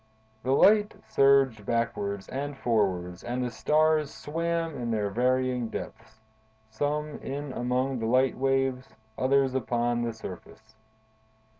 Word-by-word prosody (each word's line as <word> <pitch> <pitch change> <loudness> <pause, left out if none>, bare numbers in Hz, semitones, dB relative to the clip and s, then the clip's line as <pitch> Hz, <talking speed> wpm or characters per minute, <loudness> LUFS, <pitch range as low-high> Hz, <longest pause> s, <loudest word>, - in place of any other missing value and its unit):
The 130 - -1
light 210 +7 +5
surged 135 -5 +4
backwards 100 -3 -2
and 140 +1 -4
forwards 95 -7 0
and 125 +1 -2
the 125 - -2
stars 155 +4 +2
swam 165 +1 -2
in 120 -3 -4
their 105 -3 -1
varying 125 +1 +1
depths: 110 - -8 0.5
some 150 +5 -2
in 140 0 -5
among 125 +2 -1
the 110 - -2
light 130 +2 +3
waves; 135 -1 0 0.2
others 135 0 +2
upon 120 -1 0
the 120 -1 -2
surface. 110 +1 -11
130 Hz, 125 wpm, -28 LUFS, 115-140 Hz, 0.5 s, light